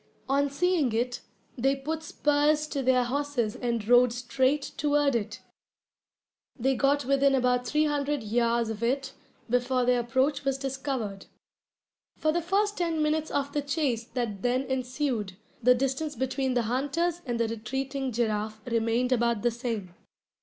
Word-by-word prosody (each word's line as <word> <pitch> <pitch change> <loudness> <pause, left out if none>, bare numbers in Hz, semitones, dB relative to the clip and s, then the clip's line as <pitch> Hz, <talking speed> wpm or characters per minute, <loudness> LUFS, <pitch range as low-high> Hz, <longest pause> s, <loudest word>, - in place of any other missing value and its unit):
On 280 +1 +2
seeing 300 -3 +1
it, 245 +2 -1 0.3
they 270 +2 +2
put 310 +4 -4
spurs 295 0 +2
to 285 -2 -3
their 255 -1 +3
horses 255 -3 -1
and 235 -4 -2
rode 245 0 +6
straight 260 +3 0
toward 290 -1 +2
it. 215 -3 -3 1.2
They 265 +2 +2
got 280 +1 +2
within 275 +1 +3
about 250 -1 +1
three 305 +3 +2
hundred 290 -2 -1
yards 235 +1 +1
of 220 0 -6
it 265 +3 -1 0.3
before 250 +1 +1
their 250 0 +3
approach 260 +5 0
was 270 -1 0
discovered. 265 -7 -4 0.9
For 310 - +1
the 345 +2 0
first 405 +4 0
ten 330 -3 0
minutes 310 +1 0
of 280 0 -2
the 295 - 0
chase 280 -5 -1
that 220 -6 -2
then 250 +2 +1
ensued, 255 -6 -2 0.2
the 250 +2 +6
distance 270 +4 -1
between 260 +1 -1
the 240 - +2
hunters 290 +9 -1
and 240 -1 -1
the 230 - +2
retreating 265 +4 -3
giraffe 215 -2 -1
remained 235 +1 0
about 235 -3 +1
the 240 - +3
same. 225 -6 -4
260 Hz, 155 wpm, -28 LUFS, 235-285 Hz, 1.2 s, rode